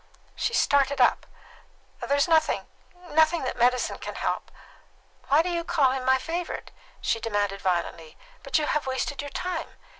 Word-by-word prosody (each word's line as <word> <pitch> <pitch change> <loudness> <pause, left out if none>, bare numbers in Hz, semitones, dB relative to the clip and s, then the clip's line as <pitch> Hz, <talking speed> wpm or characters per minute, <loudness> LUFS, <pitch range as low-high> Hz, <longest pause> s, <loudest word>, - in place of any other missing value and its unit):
She - - -1
started 280 0 +3
up. 245 - +3 0.7
"There 280 - 0
is 285 - +3
nothing 320 -2 +2 0.5
nothing 320 +1 +3
that 255 - -2
medicine 250 +1 +1
can - - -6
help. - - -2 0.8
Why 295 +4 +4
do 360 - -2
you 340 -1 -1
call 305 -7 +2
him 260 -1 -3
my 260 0 +5
favourite?" 335 +6 -4 0.3
she 225 - 0
demanded 205 -3 -1
violently. 170 -3 -2 0.2
"But - - 0
you 305 - +1
have 300 -2 -1
wasted 265 +1 -2
your 285 - -6
time. 350 +3 -4
280 Hz, 160 wpm, -26 LUFS, 250-320 Hz, 0.8 s, my